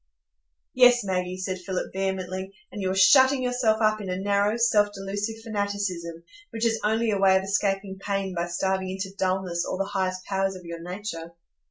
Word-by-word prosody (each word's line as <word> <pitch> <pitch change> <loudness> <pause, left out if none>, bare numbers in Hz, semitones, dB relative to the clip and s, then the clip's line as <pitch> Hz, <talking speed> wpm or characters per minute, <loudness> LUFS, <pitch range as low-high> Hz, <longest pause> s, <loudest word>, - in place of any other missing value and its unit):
"Yes, 245 -2 +6
Maggie," 185 -1 -2
said 185 0 -3
Philip, 185 0 -4
vehemently; 190 0 -3 0.2
"and 205 - -6
you 190 - 0
are 190 - -1
shutting 260 +7 +6
yourself 245 -3 +1
up 215 0 +2
in 195 - -6
a 180 - -2
narrow, 200 +2 +1
self 215 -3 +3
delusive 205 +3 -4
fanaticism, 200 -6 -3 0.3
which 225 +1 -2
is 225 -1 +1
only 220 +1 +1
a 200 - 0
way 190 -1 +5
of 190 - -1
escaping 195 0 -1
pain 195 -2 -2
by 170 0 -2
starving 190 +2 -1
into 190 0 -5
dulness 185 -2 -1
all - - -3
the 195 - -1
highest 185 -1 -1
powers 195 -1 -1
of 180 -1 -11
your 170 0 -7
nature. 175 -2 -6
195 Hz, 185 wpm, -26 LUFS, 185-210 Hz, 0.3 s, Yes